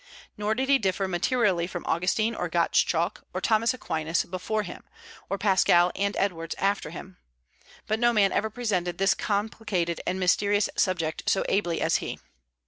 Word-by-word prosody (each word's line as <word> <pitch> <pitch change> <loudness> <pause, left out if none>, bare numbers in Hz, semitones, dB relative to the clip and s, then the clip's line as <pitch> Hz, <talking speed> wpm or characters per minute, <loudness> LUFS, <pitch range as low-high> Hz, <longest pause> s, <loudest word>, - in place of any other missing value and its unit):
Nor 210 +1 -1
did 265 +2 -1
he 275 0 +4
differ 195 -2 0
materially 185 -1 +1
from 175 -1 -6
Augustine, 185 +7 +1
or - - -3
Gottschalk, - - +1
or - - 0
Thomas 225 +1 +2
Aquinas 160 -9 -1
before 190 +4 -3
him, 180 - -9 0.5
or 195 - -1
Pascal 180 -3 +4
and 200 +1 -1
Edwards 165 -5 -2
after 200 +1 0
him. 185 -1 -10 0.7
But 215 +1 -1
no 240 0 +4
man 205 -4 +3
ever 220 - 0
presented 190 -7 -2
this 195 +1 +3
complicated 205 -4 -2
and 185 - -1
mysterious 200 +3 +2
subject 165 -4 0
so 195 - +1
ably 175 -4 0
as - - +2
he. - - -5
195 Hz, 160 wpm, -26 LUFS, 175-215 Hz, 0.7 s, he